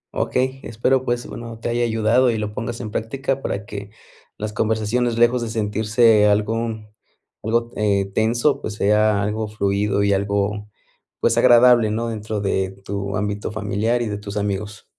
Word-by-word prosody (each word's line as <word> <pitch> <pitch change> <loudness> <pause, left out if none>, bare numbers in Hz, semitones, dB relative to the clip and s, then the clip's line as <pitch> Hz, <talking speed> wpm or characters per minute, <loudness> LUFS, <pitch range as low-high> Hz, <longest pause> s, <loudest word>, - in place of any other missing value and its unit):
Okey. 130 +1 0
Espero, 125 +3 0
pues, 120 -1 -1
bueno, 115 -1 -8
te 115 - -3
haya 120 0 0
ayudado, 115 +2 +2
y 115 - 0
lo 105 0 -4
pongas 115 +2 -4
en 110 -3 -6
práctica. 135 +5 -2
Para 100 -4 -3
que, 100 -1 -7 0.5
las 105 0 -4
conversaciones, 110 +2 0
lejos 120 +1 +3
de 115 - -3
sentirse 110 0 +3
algo 110 +2 0 0.7
algo, 115 +2 0
eh 100 -2 0
tenso, 120 +7 +1
pues 105 - -5
sea 105 0 +2
algo 105 +1 -2
fluido, 100 -1 0
y 100 0 +3
algo 100 +1 -1 0.5
pues, 115 - +2
agradable, 120 -2 +6
¿no? 115 +2 -2
Dentro 110 -1 -4
de 95 -1 0 0.2
tu 100 0 -3
ámbito 105 0 -3
familiar, 110 +3 -1
y - - -3
de 105 -1 -4
tus 105 0 -7
amigos. 105 +1 -3
110 Hz, 165 wpm, -21 LUFS, 105-115 Hz, 0.7 s, agradable